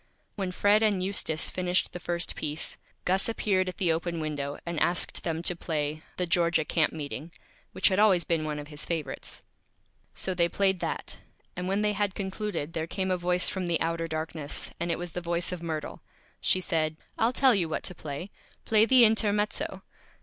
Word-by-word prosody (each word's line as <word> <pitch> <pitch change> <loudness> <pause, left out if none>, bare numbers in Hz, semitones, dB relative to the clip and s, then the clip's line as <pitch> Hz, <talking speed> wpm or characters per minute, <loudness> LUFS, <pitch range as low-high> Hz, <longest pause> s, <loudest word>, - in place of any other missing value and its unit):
When 190 -3 -2
Fred 205 +3 +4
and 205 -4 +2
Eustace 175 -5 0
finished 180 0 0
the 180 - -5
first 170 0 -2
Piece, 150 +1 -3 0.3
Gus 190 +4 +2
appeared 190 -4 +1
at 180 - -8
the 180 -4 +2
open 170 +1 -1
Window, 145 -2 -3
and 170 -2 -2
asked 175 - +2
them 165 -1 -2
to 180 - +1
play 155 -2 -2 0.2
"The 180 - +1
Georgia 170 -2 +2
Camp 160 -1 +2
Meeting," 155 +1 -6 0.4
which - - +3
had 190 0 +1
always 195 -5 +5
been 165 -2 0
one 150 -1 -2
of 145 0 -7
his 150 -1 -4
Favorites. 155 -5 -4 0.7
So 190 - -1
they 170 -1 +2
played 190 -1 +2
that, - - -3 0.4
and 180 +1 -3
when 195 +2 +1
they 210 0 +2
had 205 -1 0
Concluded 190 -5 -3
there 160 -1 -2
came 190 +2 -1
a - - +3
Voice 180 +1 +2
from 185 -2 -1
the 170 -2 +2
Outer 165 0 -1
Darkness, 155 -2 -3
and 170 +1 -2
it 165 - +1
was 175 -1 -5
the 180 - -4
Voice 170 +1 -2
of 180 -2 -4
Myrtle. 160 -3 -4 0.4
She 185 - +3
said: 160 -3 0 0.2
"I'll 225 +2 +4
tell 260 0 +5
you 180 -6 +1
what 155 - -2
to 180 - -2
Play; 160 +4 -6 0.3
play 220 0 +5
the 255 -2 +8
Intermezzo." 210 -1 +1
175 Hz, 195 wpm, -28 LUFS, 160-190 Hz, 0.7 s, the